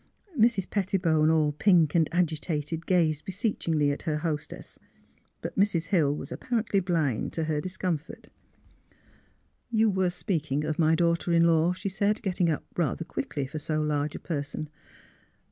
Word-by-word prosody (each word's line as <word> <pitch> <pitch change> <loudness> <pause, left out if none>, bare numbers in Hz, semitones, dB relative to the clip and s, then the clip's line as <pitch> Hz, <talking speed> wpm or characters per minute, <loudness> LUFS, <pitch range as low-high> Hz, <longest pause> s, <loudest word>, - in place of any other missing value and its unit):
Mrs. 225 -6 +3
Pettibone, 175 -6 +1
all 155 -2 +3
pink 165 -1 +3
and 165 -3 +3
agitated, 165 -1 -1
gazed 160 -5 +2
beseechingly 170 -7 0
at 140 - -4
her 155 -3 -1
hostess. 150 -1 -4 0.6
But - - -5
Mrs. 170 -5 +2
Hill 150 -7 +3
was - - -7
apparently 225 -5 0
blind 165 - -1
to 165 - -1
her 155 -1 -1
discomfort. 180 -3 -4 0.7
*' - - -36
You 220 -1 +4
were 190 -1 +1
speaking 155 -5 -2
of 155 +1 -2
my 160 0 +4
daughter 170 +1 +1
in 170 0 +5
law," 165 +1 +3
she 190 +2 -4
said, 200 +3 0
getting 180 -3 +1
up 155 - -2
rather 165 0 -1
quickly 145 -3 -3
for 145 +4 -6
so 155 +1 -2
large 150 -1 -1
a - - -5
person. 150 -1 -4
165 Hz, 155 wpm, -27 LUFS, 150-185 Hz, 0.7 s, in